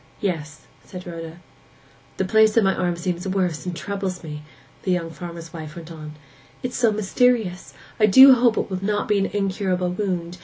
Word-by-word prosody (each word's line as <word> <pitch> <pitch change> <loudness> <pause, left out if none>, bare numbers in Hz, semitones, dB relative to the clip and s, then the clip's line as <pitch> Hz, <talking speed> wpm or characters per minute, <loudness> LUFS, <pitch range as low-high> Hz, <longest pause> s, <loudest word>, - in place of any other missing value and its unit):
'Yes,' 155 -5 -4 0.2
said 180 -1 -10
Rhoda. 165 -1 -8 0.8
'The 190 - 0
place 220 +2 +4
on 225 - +6
my 195 0 +3
arm 175 -2 -1
seems 175 +1 -3
worse, 185 -4 -1
and 180 - -3
troubles 195 -1 -4
me!' 150 -2 -7 0.4
the - - -4
young 170 -2 -1
farmer's 170 +1 -9
wife 155 -1 -8
went 170 -1 -9
on. 155 -2 -9 0.5
'It 250 - -1
is - - -9
so 235 -3 +3
mysterious! 215 -2 0 0.2
I 215 - +5
do 260 +6 +9
hope 240 -2 +3
it - - -2
will 185 0 -3
not 205 +1 -1
be 210 -1 +2
an 195 - +1
incurable 190 -2 -1
wound. 180 -3 -3
185 Hz, 190 wpm, -23 LUFS, 170-205 Hz, 0.8 s, do